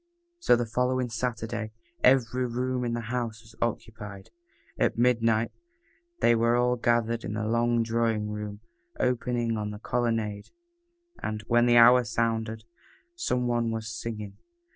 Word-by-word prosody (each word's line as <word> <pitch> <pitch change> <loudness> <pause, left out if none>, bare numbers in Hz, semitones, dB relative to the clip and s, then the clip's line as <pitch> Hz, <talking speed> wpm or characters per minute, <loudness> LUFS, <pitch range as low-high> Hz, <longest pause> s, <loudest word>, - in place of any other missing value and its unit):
So 345 - +5
the 120 0 0
following 125 +2 0
Saturday 115 -1 -3 0.3
every 125 -1 +3
room 125 +1 -2
in 120 -1 -1
the 115 -1 -4
house 115 -3 -3
was 110 -1 -17
occupied. 105 -4 -4 0.5
At - - +1
midnight 115 -2 +2 0.7
they 120 - +5
were 115 +1 +3
all 125 0 +2
gathered 115 -1 +1
in - - -4
the 110 0 -2
long 115 +1 +2
drawing 115 -2 0
room 105 -1 -6 0.4
opening 120 -2 0
on 105 -1 -3
the 105 - -6
colonnade, 110 -3 -2 0.7
and, 110 0 -3
when 120 +1 +3
the 120 0 +5
hour 125 +2 +8
sounded, 115 -1 -1 0.5
some 235 - -1
one 120 -1 +1
was 115 0 -4
singing. 110 -3 -6
115 Hz, 140 wpm, -27 LUFS, 110-120 Hz, 0.7 s, hour